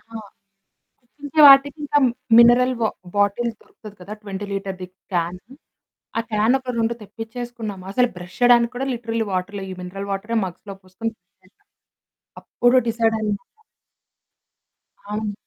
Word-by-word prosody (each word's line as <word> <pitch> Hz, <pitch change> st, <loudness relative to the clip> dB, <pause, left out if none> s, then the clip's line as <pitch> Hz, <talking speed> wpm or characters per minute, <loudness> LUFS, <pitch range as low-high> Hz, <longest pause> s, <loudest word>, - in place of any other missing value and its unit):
ఆ! 225 Hz, +2 st, -12 dB, 1.1 s
ఇంకే 290 Hz, +2 st, 0 dB
వాటికి 275 Hz, +1 st, +7 dB
ఇంకా 290 Hz, 0 st, +2 dB, 0.4 s
మినరల్ 245 Hz, +2 st, +6 dB
వా 220 Hz, -, +3 dB, 0.3 s
బాటిల్ 205 Hz, +4 st, +1 dB
దొరుకుతది 210 Hz, -2 st, -14 dB
కదా! 200 Hz, +4 st, -9 dB
20 200 Hz, 0 st, -6 dB
లీటర్‌ది 195 Hz, -2 st, -4 dB, 0.3 s
క్యాను 180 Hz, +8 st, -3 dB, 0.6 s
ఆ -, -, +3 dB
క్యానొక 250 Hz, +5 st, +1 dB
2 230 Hz, +1 st, +1 dB
తెప్పించేసుకున్నాాము. 225 Hz, -2 st, -7 dB
అసలు 250 Hz, +3 st, +3 dB
బ్రష్ 180 Hz, +1 st, -11 dB
చేయడానికి 240 Hz, -1 st, +5 dB
కూడా 270 Hz, -, -2 dB
లిటరల్లీ 230 Hz, -1 st, -2 dB
వాటర్ 185 Hz, +2 st, -3 dB
లేదు. 190 Hz, -1 st, -6 dB
ఈ 185 Hz, -, -8 dB
మినరల్ 195 Hz, +2 st, -6 dB
వాటరే 215 Hz, +4 st, -3 dB
మగ్స్‌లో 190 Hz, +2 st, -8 dB
పోసుకొని 185 Hz, +5 st, -5 dB
బ్రష్ 180 Hz, 0 st, -57 dB
చేాసాం 310 Hz, -, -29 dB, 0.8 s
అప్పుడు 245 Hz, +1 st, +3 dB
డిసైడయ్యము. 220 Hz, -2 st, 0 dB, 1.7 s
అవును. 210 Hz, 0 st, -2 dB
220 Hz, 130 wpm, -22 LUFS, 195-240 Hz, 1.7 s, వాటికి